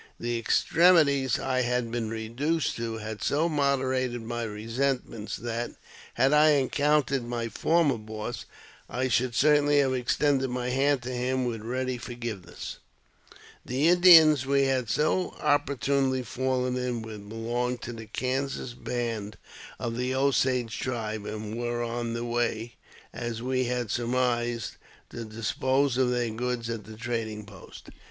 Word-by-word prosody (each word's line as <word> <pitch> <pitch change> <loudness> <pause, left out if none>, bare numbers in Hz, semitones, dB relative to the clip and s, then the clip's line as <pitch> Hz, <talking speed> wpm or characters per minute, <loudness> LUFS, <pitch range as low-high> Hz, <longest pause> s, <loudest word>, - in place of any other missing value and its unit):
The 120 0 -1
extremities 140 0 +4
I 130 -1 0
had 125 -1 0
been 115 -2 -2
reduced 120 +9 -1
to 115 -1 -3
had 110 0 -6
so 155 +4 +1
moderated 130 -5 0
my 120 +1 -4
resentments 115 +1 -2
that, 120 0 -4 0.4
had 135 +4 +3
I 150 0 +6
encountered 140 -1 +2
my 120 -1 -3
former 155 -3 +2
boss, 110 +2 -6 0.4
I 130 +1 -1
should 125 -1 +1
certainly 145 0 +4
have 135 -2 +3
extended 135 +2 +1
my 125 0 -2
hand 135 0 +2
to 125 - -4
him 125 +1 -1
with 115 -3 -3
ready 130 +2 -2
forgiveness. 120 -6 -6 0.8
The 135 +6 +1
Indians 165 -5 +8
we 140 0 +3
had 130 -4 0
so 155 - +1
opportunely 140 -2 +1
fallen 125 +1 -1
in 125 -2 -2
with 105 -2 -9
belonged 120 +2 -2
to 120 - -5
the 115 -1 -9
Kansas 130 0 -2
band 115 -4 -4 0.4
of 115 -1 -3
the 125 +1 -1
Osage 130 -3 +1
tribe, 110 -4 -3
and 105 0 -5
were 120 0 -2
on 120 0 -3
the 115 0 -3
way, 120 -1 -1 0.4
as 120 -1 -4
we 130 0 0
had 120 -3 -2
surmised, 120 -1 -1 0.3
to 120 - -6
dispose 130 +5 0
of 130 -1 +3
their 120 -2 0
goods 120 0 -2
at 115 -2 -5
the 110 0 -11
trading 110 -3 -3
post. 100 -3 -13
125 Hz, 145 wpm, -27 LUFS, 115-135 Hz, 0.8 s, Indians